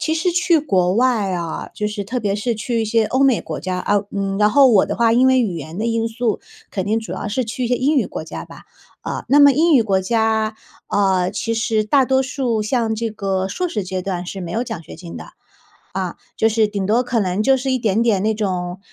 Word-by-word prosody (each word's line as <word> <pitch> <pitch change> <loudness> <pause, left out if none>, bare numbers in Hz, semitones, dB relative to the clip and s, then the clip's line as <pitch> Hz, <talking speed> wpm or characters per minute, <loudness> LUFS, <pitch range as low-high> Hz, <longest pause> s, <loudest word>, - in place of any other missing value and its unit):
其 315 - 0
实 330 +2 0
去 345 -1 +3
国 185 -10 +1
外 235 -6 +2
啊， 170 -3 -4
就 210 - -3
是 210 -1 -3
特 240 +6 -3
别 205 -3 -1
是 220 +3 -1
去 230 +1 -1
一 - - -1
些 220 +1 +2
欧 260 +5 +1
美 265 -5 +4
国 - - -6
家 185 0 -3
啊 205 +1 +1
嗯， 195 -1 -2
然 210 0 +4
后 275 +4 +6
我 210 -5 +4
的 - - -3
话 230 -1 +3
因 255 +2 +4
为 260 -1 +4
语 190 -8 -1
言 160 +4 -7
的 225 - -1
因 230 0 0
素， 225 -1 -2 0.3
肯 190 -2 -3
定 220 +2 +1
主 225 - -7
要 205 - -4
是 245 +4 -1
去 245 +3 -4
一 - - -1
些 245 - +2
英 285 +3 +1
语 - - +2
国 - - -6
家 - - -7
吧。 - - -14 0.4
呃， - - -4
那 285 - +5
么 285 -1 +8
英 320 +4 +3
语 240 - +6
国 195 -2 +1
家， 220 +1 0 0.3
呃， 190 -2 +1
其 230 +2 -2
实 220 -1 0
大 265 +5 +3
多 265 +1 +2
数 255 -4 -1
像 225 +1 0
这 230 +1 -2
个 195 -3 -2
硕 355 - -2
士 210 - -3
阶 185 0 -4
段 180 -2 -4
是 190 +1 -6
没 170 - -6
有 230 +7 -1
奖 225 -9 -6
学 - - -11
金 170 -2 -9
的， - - -8 0.7
啊， - - -3 0.2
就 220 - +3
是 220 -1 +2
顶 200 -2 -3
多 225 +5 +3
可 245 -2 -1
能 190 +1 0
就 265 +4 +3
是 265 +1 -2
一 255 - +1
点 220 0 +1
点 210 -5 +2
那 220 +1 +1
种， 180 -3 -3
220 Hz, 275 characters per minute, -20 LUFS, 195-245 Hz, 0.7 s, 么